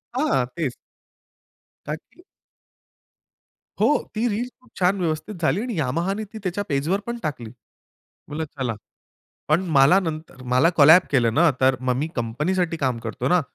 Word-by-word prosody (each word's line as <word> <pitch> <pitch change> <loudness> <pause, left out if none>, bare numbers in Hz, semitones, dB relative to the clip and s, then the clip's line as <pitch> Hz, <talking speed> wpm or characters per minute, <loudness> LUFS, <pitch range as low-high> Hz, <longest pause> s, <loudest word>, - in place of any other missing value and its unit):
हां, 260 - +2
तेच. 155 -7 -2 1.1
का 150 - -2
की 255 - -19 1.6
हो. - - +4 0.3
ती 230 +3 +1
रील्स 235 +3 -2
खूप 250 - -23
छान 185 +1 +2
व्यवस्थित 165 +4 -2
झाली 165 +6 +1
आणि 245 -2 -4
Yamahaनी 170 +10 -1
ती - - -6
त्याच्या 190 +2 -2
पेजवर 150 +8 0
पण 235 0 -3
टाकली. 125 -8 -4 0.6
मी 150 - -12
म्हटलं 160 - -1 0.2
चला. 120 -4 -1 0.7
पण 155 +4 +4 0.2
मला 140 +7 +7
नंतर 155 -6 -6
मला 135 +7 +5
कोलॅब 160 +4 +8
केलं 120 -5 +2
ना, 165 +3 +5
तर 130 0 +4
मग 125 -1 0
मी 145 +4 -1
कंपनीसाठी 160 +10 -1
काम 130 -6 -1
करतो 115 -1 -3
ना. 180 0 +4
160 Hz, 155 wpm, -23 LUFS, 135-190 Hz, 1.6 s, कोलॅब